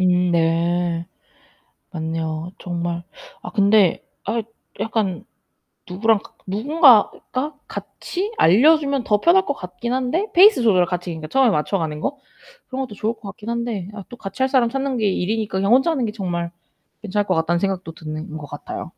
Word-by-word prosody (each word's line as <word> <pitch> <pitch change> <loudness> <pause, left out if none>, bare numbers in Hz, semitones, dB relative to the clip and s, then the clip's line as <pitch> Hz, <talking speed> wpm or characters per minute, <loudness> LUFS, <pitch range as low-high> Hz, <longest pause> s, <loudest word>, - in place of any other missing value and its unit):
음 180 -1 +3
네. 170 +1 +1 0.9
맞네요. 160 0 -3
정말. 175 -1 -3 0.4
아 - - -8
근데 200 -3 +3 0.2
아 230 - 0
이 225 - -3 0.4
약간 210 -5 -1 0.6
누구랑 215 +4 +2
가 - - -17
누군가가 260 - +3
같이 385 +4 -5
알려 265 - +6
주면 280 -3 -1
더 210 -3 +2
편할 365 - +4
것 285 - -1
같긴 180 +5 -5
한데 260 +11 0
페이스 380 - +7
조절을 190 -6 +4
같이 180 0 -4
그러니까 160 -2 -6
처음에 270 +4 +4
맞춰 190 +3 0
가는 155 -3 -3
거 280 - -3 0.5
그런 260 +1 -3
것도 245 -6 -6
좋을 220 +3 -1
것 - - -29
같긴 205 +2 -9
한데 235 -5 -3
아 200 -3 -8
또 245 - -9
같이 195 +4 -5
할 265 - +3
사람 250 -4 +3
찾는 270 0 -2
게 215 - +1
일이니까 205 +2 -1
그냥 195 +4 +2
혼자 265 +6 +5
하는 270 -7 0
게 215 - -2
정말 175 -5 -3 0.5
괜찮을 205 -1 -1
것 185 - +1
같다는 165 +1 +1
생각도 190 -4 -2
드는 155 +1 -7
것 150 - -7
같아요. - - -7
200 Hz, 335 characters per minute, -21 LUFS, 175-245 Hz, 0.9 s, 페이스